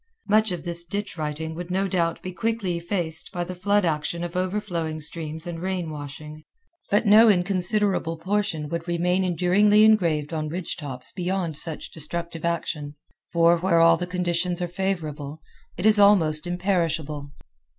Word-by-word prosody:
Much 215 0 +3
of 175 -3 -4
this 170 0 -1
ditch 200 +4 -4
writing 160 0 -4
would 175 +2 -7
no 190 +2 0
doubt 170 -3 0
be 185 - -5
quickly 225 -3 -1
effaced 170 -2 -2
by 175 -3 -3
the 180 +1 -6
flood 200 +2 +1
action 165 +1 -1
of 175 0 -6
overflowing 180 -4 -2
streams 155 +1 -6
and 170 -1 -5
rain 180 -3 -3
washing; 150 +1 -8 0.5
but 205 +3 +2
no 215 +2 +7
inconsiderable 185 -2 +3
portion 185 -4 -1
would 170 +2 -4
remain 180 +2 +1
enduringly 185 +4 +4
engraved 170 -9 +3
on 155 -1 -2
ridge 175 +2 -4
tops 135 -5 -6
beyond 180 -3 -2
such 160 +1 -3
destructive 170 +1 -4
action; 155 -3 -3 0.4
for, 170 0 +4
where 170 -1 +2
all 165 0 +6
the 180 +2 -4
conditions 180 0 0
are 175 - -1
favorable, 160 -6 -4 0.4
it 175 - -3
is 215 -1 +5
almost 175 -6 +4
imperishable. 165 -5 -1
175 Hz, 160 wpm, -24 LUFS, 160-190 Hz, 0.5 s, no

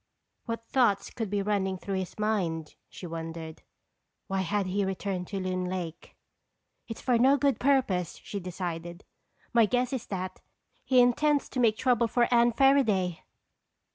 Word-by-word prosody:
What 230 0 -4
thoughts 230 -5 +2
could 225 -4 -4
be 200 0 0
running 195 -2 0
through 190 +1 -3
his 185 - -6
mind, 180 -8 -1 0.2
she - - -10
wondered? 165 -1 -6 0.6
Why 195 -1 -1
had 200 +2 0
he 195 +2 0
returned 190 -1 -3
to 195 - -4
Loon 185 -1 -2
Lake? 180 -3 -5 0.7
"It's 225 - -7
for 245 -3 +2
no 270 +4 +5
good 280 -1 +1
purpose," 250 - +1
she 200 - -5
decided. 175 -1 -5 0.5
"My 230 -2 +5
guess 250 +3 0
is 250 -3 -4
that 185 -1 -5 0.4
he 255 -1 +4
intends 285 +4 +3
to 255 - -4
make 225 -3 +3
trouble 245 -3 +2
for 240 +1 +2
Anne 240 0 +5
Fairaday!" 220 -10 +3
200 Hz, 155 wpm, -28 LUFS, 180-240 Hz, 0.7 s, no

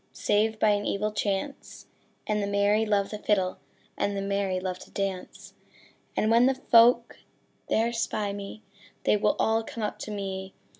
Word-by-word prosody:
Save 220 +1 +1
by 215 - +4
an 205 0 +2
evil 210 +1 -1
chance, 210 +6 -3 0.4
And 210 -1 0
the 200 - -1
merry 205 +2 +2
love 200 -2 +1
the 210 - -5
fiddle 190 -4 0 0.4
And 200 0 -1
the - - -1
merry 195 -2 -1
love 185 -1 -4
to - - -13
dance: 195 -2 -5 0.6
And 215 - +2
when 235 +2 +6
the 270 - +2
folk 235 -1 +4 0.5
there 230 +2 +1
spy 215 -3 -1
me, 200 +2 -8 0.4
They - - +3
will 210 - +2
all 225 0 +2
come 225 0 -6
up 210 - -3
to - - -6
me. 195 -2 -5
205 Hz, 170 wpm, -27 LUFS, 200-220 Hz, 0.6 s, when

